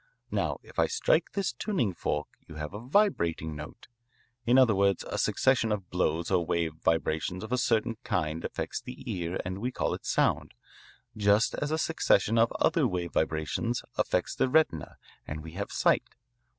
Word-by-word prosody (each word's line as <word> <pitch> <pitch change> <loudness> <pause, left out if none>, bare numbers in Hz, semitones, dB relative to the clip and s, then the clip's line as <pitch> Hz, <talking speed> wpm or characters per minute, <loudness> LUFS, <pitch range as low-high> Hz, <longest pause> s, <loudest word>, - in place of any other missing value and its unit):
Now - - 0
if - - -8
I - - +4
strike 480 +2 +1
this 195 -9 -1
tuning 120 - -1
fork 75 -3 -2 0.2
you 80 - -10
have 75 +3 -5
a 105 - -5
vibrating 115 - +1
note. 75 +1 -9 0.6
In 125 +2 +5
other 130 -4 +6
words, 100 -1 +2
a - - -3
succession 130 -4 +2
of 100 -4 -3
blows 85 -1 0
or 90 -2 +3
wave 80 -1 -1
vibrations 80 +3 0
of 110 - -7
a 125 - +2
certain 115 -1 +1
kind 80 +1 -1
affects - - -4
the - - -8
ear 85 0 -3
and 95 +2 -4
we 125 +4 -2
call - - -1
it - - -7
sound, - - +1 0.6
just 105 +1 +3
as 145 - -2
a 155 - 0
succession 115 - +2
of 115 +1 +4
other 150 -6 +3
wave 90 -4 -3
vibrations 80 +10 -1
affects - - 0
the 130 - +1
retina 130 - +1 0.3
and 75 0 -5
we 80 - -8
have 100 +4 -5
sight. - - +2
100 Hz, 175 wpm, -29 LUFS, 80-125 Hz, 0.6 s, other